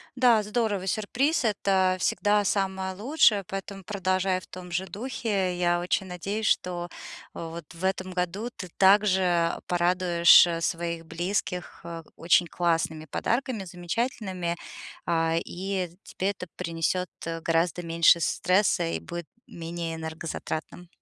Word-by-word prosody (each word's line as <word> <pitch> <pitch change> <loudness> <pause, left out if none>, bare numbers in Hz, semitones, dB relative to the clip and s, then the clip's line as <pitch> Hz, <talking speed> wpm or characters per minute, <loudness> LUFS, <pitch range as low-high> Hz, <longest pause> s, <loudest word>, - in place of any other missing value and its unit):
Да, 245 -4 +5
здорово. 210 -3 -1
Сюрприз- 255 - +1
это 190 -3 +2
всегда 205 +2 +2
самое 190 -1 -1
лучшее, 215 -2 +3
поэтому 195 +1 -6
продолжай 185 -1 0
в - - -16
том 180 -1 -10
же 185 +2 -1
духе. 205 -5 -2
Я 175 0 +2
очень 180 +2 -1
надеюсь, 195 +5 -3
что 175 -1 0 0.4
вот 165 0 -7
в 170 - -11
этом 185 0 -1
году 185 +6 -2
ты 180 - -7
также 190 -4 +4
порадуешь, 175 -1 +6
э, 165 -1 -2
своих 170 -1 -2
близких, 180 +2 -3
э, 170 -1 -6
очень 175 +1 +3
классными 165 -2 0
подарками, 235 - -1
замечательными, 180 -1 -3 0.5
а 165 -1 +1
и 185 0 -3
тебе 190 - -2
это 180 -2 -8
принесёт 170 +2 -1 0.3
гораздо 170 +1 +1
меньше 165 0 +5
стресса, 185 +4 +2
и 80 -1 -2
будет 170 - -7 0.2
менее 165 0 -5
энергозатратным. 160 +1 -5
180 Hz, 125 wpm, -27 LUFS, 170-195 Hz, 0.5 s, порадуешь